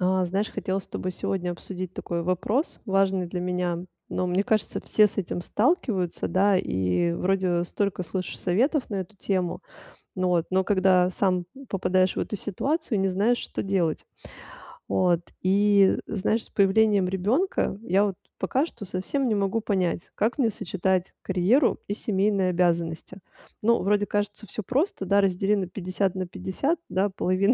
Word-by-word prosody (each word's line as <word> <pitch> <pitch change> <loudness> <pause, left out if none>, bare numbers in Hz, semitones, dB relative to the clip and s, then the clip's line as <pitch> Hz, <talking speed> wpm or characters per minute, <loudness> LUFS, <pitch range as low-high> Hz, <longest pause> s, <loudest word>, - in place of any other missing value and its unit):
А 185 0 +2
знаешь, 195 +4 -1
хотелось 190 0 -3
с - - -23
тобой 185 - -4
сегодня 180 -1 -2
обсудить 185 +1 -6
такой 170 -1 -3
вопрос 195 - -1
важный 195 -2 +2
для 175 +1 -4
меня, 180 -1 -1 0.3
но, 185 - -1
мне 180 +2 +1
кажется, 215 +1 0
все 215 - +5
с 210 - -6
этим 175 -2 -2
сталкиваются, 210 - 0
да, 195 0 +3
и 95 - 0
вроде 180 -1 +1
столько 200 +1 -2
слышишь 185 +2 -4
советов 245 - +1
на 205 - -2
эту 190 +2 -5
тему, 185 -3 -1 0.5
но 185 -1 0
вот, 175 -2 +2
но 190 0 +2
когда 185 -2 +3
сам 185 -1 +1 0.2
попадаешь 185 -1 +1
в - - 0
эту 210 - -3
ситуацию, 265 - -1
не 195 - +2
знаешь, 205 +6 +2
что - - -4
делать. 185 -5 0 0.8
Вот 175 -2 +2 0.2
и, 200 +1 +4
знаешь, 215 +2 0
с - - -14
появлением 200 -1 +3
ребенка 205 - 0
я 195 +1 +3
вот 195 -2 -2 0.2
пока 260 +10 +1
что 215 - -9
совсем 190 +9 -2
не 220 - +1
могу 200 +2 0
понять, 185 -5 -1
как 225 +3 0
мне 250 -5 +3
сочетать 190 -2 -1
карьеру 200 +9 +2
и 205 - -1
семейные 195 -2 +1
обязанности. 170 0 0 0.4
Ну, 235 +1 +4
вроде 205 +2 +2
кажется 205 +1 -2
всё 215 - -5
просто, 265 - 0
да, 200 +2 +4
раздели 195 +1 +2
на 190 -3 -1
50 185 +1 -2
на 185 -1 -3
50, 195 - -2
да, 195 +2 +1
половина 190 +3 +2
190 Hz, 165 wpm, -26 LUFS, 180-205 Hz, 0.8 s, все